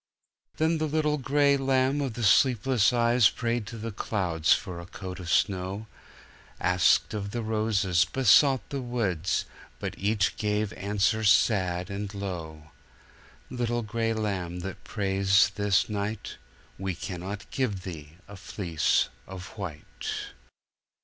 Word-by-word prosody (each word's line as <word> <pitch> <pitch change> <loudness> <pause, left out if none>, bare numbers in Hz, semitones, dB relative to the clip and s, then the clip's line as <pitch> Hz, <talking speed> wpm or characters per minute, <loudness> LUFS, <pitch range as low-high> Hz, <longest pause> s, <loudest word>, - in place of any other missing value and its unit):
"Then 160 +1 +1
the 155 - 0
little 150 0 0
gray 140 +1 +3
lamb 135 +1 +1
of 130 -5 -3
the 120 - -4
sleepless 125 +1 +4
eyes 120 -2 +4
prayed 115 -3 -2
to 115 - -7
the 115 +1 -5
clouds 90 -6 -1
for 90 -2 +1
a 85 - -9
coat 95 0 -7
of 90 -2 -7
snow, 95 +3 0 0.7
Asked 90 +4 +3
of 100 -2 -3
the 115 +3 -4
roses, 105 -5 +2
besought 130 - +4
the 140 -1 -2
woods; 100 -9 -1 0.3
but - - -4
each 100 0 +1
gave 105 -1 -1
answer 105 +2 0
sad 95 -3 +2
and 100 0 -4
low: 80 -6 -6 0.8
"Little 120 -1 -1
gray 115 +1 -1
lamb 90 -5 -3
that 95 +1 -7
prays 95 -1 +2
this 100 -2 +2
night, 105 0 -4 0.4
We 95 -2 -2
cannot 95 +4 -6
give 105 -9 -1
thee 80 -5 -8
a 100 0 -10
fleece 85 -5 0 0.2
of 95 0 -8
white." 90 -8 -7
105 Hz, 135 wpm, -27 LUFS, 95-120 Hz, 0.8 s, sleepless